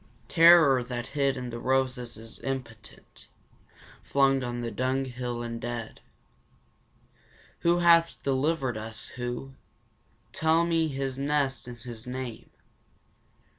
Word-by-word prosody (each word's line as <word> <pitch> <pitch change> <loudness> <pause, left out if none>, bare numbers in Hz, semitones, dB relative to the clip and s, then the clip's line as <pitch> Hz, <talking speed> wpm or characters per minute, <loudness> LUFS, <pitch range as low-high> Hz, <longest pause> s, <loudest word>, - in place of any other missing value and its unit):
Terror 165 -6 +7
that 120 -1 -4
hid 140 -2 +1
in 125 -1 -5
the 115 - -5
roses 130 -2 -1
is 115 +1 -10
impotent 115 -5 -8 0.7
flung 135 -1 +2
on 120 0 -3
the 115 -1 -3
dung 130 +1 -1
hill 120 -1 -4
and 115 -1 -5
dead! 120 -2 -5 1.6
Who 170 +1 +3
hath 170 -1 +4
delivered 135 -2 0
us, 110 0 -6
who? 120 +2 -5 0.8
Tell 160 +1 +3
me 165 -1 +1
his 135 -2 -3
nest 140 -3 0
and 120 -1 -8
his 115 0 -9
name. 125 -2 -6
130 Hz, 120 wpm, -28 LUFS, 120-140 Hz, 1.6 s, Terror